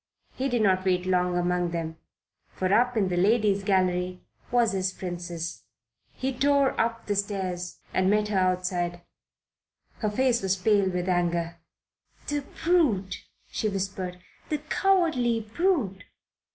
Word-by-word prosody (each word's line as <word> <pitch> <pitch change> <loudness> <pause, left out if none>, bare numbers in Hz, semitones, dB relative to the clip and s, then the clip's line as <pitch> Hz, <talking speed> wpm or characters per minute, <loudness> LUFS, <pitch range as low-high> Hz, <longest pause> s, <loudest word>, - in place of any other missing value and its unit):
He 270 +1 -2
did 240 -3 +1
not 185 -2 +3
wait 180 -1 +1
long 180 -1 +1
among 175 0 +1
them, 165 -1 -4 0.5
for 185 +1 -1
up 245 +2 +3
in 195 -3 +2
the 180 - -1
Ladies' 205 +1 +3
Gallery 185 -2 +1 0.3
was 240 -2 +3
his 190 -1 0
Princess. 175 -2 -5 0.5
He 265 +1 -3
tore 280 0 +3
up 230 0 -2
the 205 - -1
stairs 190 -3 -3 0.2
and 185 0 +2
met 210 +1 +2
her 200 -3 +1
outside. 180 -1 0 1.0
Her 215 - 0
face 245 +2 +2
was 190 0 +1
pale 200 0 +2
with 180 0 -2
anger. 170 -2 0 0.7
"The 290 -1 -1 0.2
brute!" 280 - +2 0.3
she 215 - -1
whispered. 190 -2 -3 0.3
"The 305 - +1
cowardly 305 - +1
brute!" 220 - 0
195 Hz, 140 wpm, -27 LUFS, 180-230 Hz, 1.0 s, not